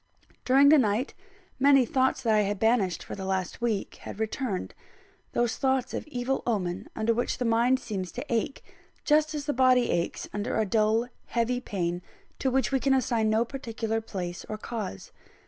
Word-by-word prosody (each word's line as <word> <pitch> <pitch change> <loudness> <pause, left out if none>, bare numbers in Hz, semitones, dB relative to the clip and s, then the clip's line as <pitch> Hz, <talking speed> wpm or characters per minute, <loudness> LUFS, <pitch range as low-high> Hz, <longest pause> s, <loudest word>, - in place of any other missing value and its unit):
During 275 +2 +6
the 305 0 +7
night, 225 +3 0 0.5
many 275 -1 +6
thoughts 260 +2 +1
that 225 -2 +3
I 215 - +4
had 205 0 -1
banished 210 -5 +1
for - - -8
the 195 - -6
last 190 +2 -2
week 225 -4 -1
had - - -9
returned 220 -2 -2 0.6
those 240 -1 0
thoughts 265 -2 0
of - - -4
evil 260 -1 -2
omen 185 -6 -2
under 220 +1 +1
which 240 +2 -1
the 250 - -2
mind 235 +3 +3
seems 190 -8 -4
to 250 - -5
ache, 230 +4 -1 0.4
just 305 0 +3
as 290 -1 -4
the 290 - 0
body 255 -1 +4
aches 170 0 -2
under 205 +2 -2
a 220 - +2
dull, 220 +3 +2 0.2
heavy 240 +1 0
pain, 175 -6 -2 0.4
to 265 - +1
which 265 +2 +1
we 270 - +2
can 270 0 +3
assign 235 -4 +1
no 220 +2 +2
particular 225 -3 -3
place 180 -5 -5
or 215 - -3
cause. 215 - -6
230 Hz, 180 wpm, -27 LUFS, 210-260 Hz, 0.6 s, the